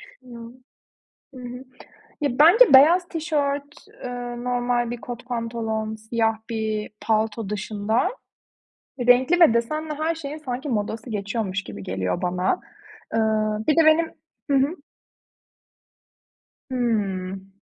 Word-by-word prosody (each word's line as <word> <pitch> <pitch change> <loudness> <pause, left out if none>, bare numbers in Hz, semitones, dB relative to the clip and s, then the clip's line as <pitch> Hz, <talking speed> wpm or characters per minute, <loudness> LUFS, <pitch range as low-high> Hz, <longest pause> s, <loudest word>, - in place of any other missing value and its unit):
Düşünüyorum. 245 - -13 0.8
Hı 255 - -10
hı. 250 +1 -8 0.6
Ya, 280 -3 -1
bence 355 - +7
beyaz 340 +7 +7
tişört, 290 -3 -2 0.2
eee 245 -1 -5
normal 245 -1 0
bir 240 - -4
kot 245 0 -7
pantolon, 230 -2 -3
siyah 225 0 -1
bir 220 -1 -2
palto 220 0 0
dışında 210 +3 -1 1.0
renkli 260 +8 +5
ve 325 -9 +7
desenli 305 +7 -1
her 315 +3 -1
şeyin 305 -2 -6
sanki 265 -1 -5
modası 225 +1 -3
geçiyormuş 200 -1 -2
gibi 100 -1 -8
geliyor 95 -1 -2
bana. 180 - 0 0.5
Iıı, 215 -1 +1
bir 305 - +3
de 330 - +6
benim 320 +1 +4 0.4
Hı 275 - +4
hı? 280 +6 +2 1.9
Hımm. 195 -6 -2
240 Hz, 115 wpm, -23 LUFS, 215-280 Hz, 1.9 s, bence